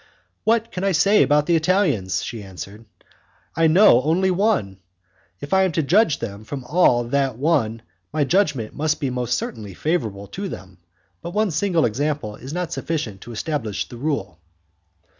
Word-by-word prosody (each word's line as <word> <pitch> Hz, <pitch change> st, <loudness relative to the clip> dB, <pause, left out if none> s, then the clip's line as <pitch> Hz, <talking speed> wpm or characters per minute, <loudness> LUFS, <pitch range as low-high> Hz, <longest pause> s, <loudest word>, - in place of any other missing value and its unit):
"What 230 Hz, 0 st, +2 dB
can 180 Hz, -, -4 dB
I 195 Hz, -1 st, +2 dB
say 200 Hz, +6 st, +4 dB
about 150 Hz, 0 st, +3 dB
the 170 Hz, -, +2 dB
Italians," 150 Hz, -, +1 dB
she 115 Hz, -, -6 dB
answered, 100 Hz, +3 st, -9 dB, 0.7 s
"I 165 Hz, 0 st, +4 dB
know 160 Hz, -, +6 dB
only 175 Hz, +6 st, +2 dB
one? 180 Hz, -, 0 dB, 0.6 s
If 145 Hz, -, -5 dB
I 190 Hz, -, +5 dB
am 190 Hz, -2 st, +2 dB
to 160 Hz, -, +1 dB
judge 175 Hz, +2 st, +3 dB
them 100 Hz, -3 st, -6 dB, 0.3 s
all 145 Hz, -8 st, +3 dB
from 120 Hz, -, -9 dB
that 135 Hz, -4 st, +1 dB
one 125 Hz, -7 st, 0 dB, 0.3 s
my 155 Hz, -1 st, +1 dB
judgment 145 Hz, -, +1 dB
must 155 Hz, 0 st, 0 dB, 0.4 s
certainly 105 Hz, -5 st, -6 dB
be -, -, -15 dB
most -, -, -21 dB
favourable 110 Hz, -, -1 dB
to 195 Hz, -, -6 dB
them, 95 Hz, -, -10 dB, 0.4 s
but 175 Hz, -, -7 dB
one 215 Hz, -2 st, +2 dB
single 175 Hz, -1 st, +1 dB
example 125 Hz, -1 st, -2 dB
is 130 Hz, +5 st, -9 dB
not 175 Hz, 0 st, -3 dB
sufficient 125 Hz, -12 st, -3 dB
to 120 Hz, -, -9 dB
establish 115 Hz, -3 st, -3 dB
the 120 Hz, -, -9 dB
rule." 140 Hz, -, -3 dB
150 Hz, 170 wpm, -22 LUFS, 110-180 Hz, 0.7 s, know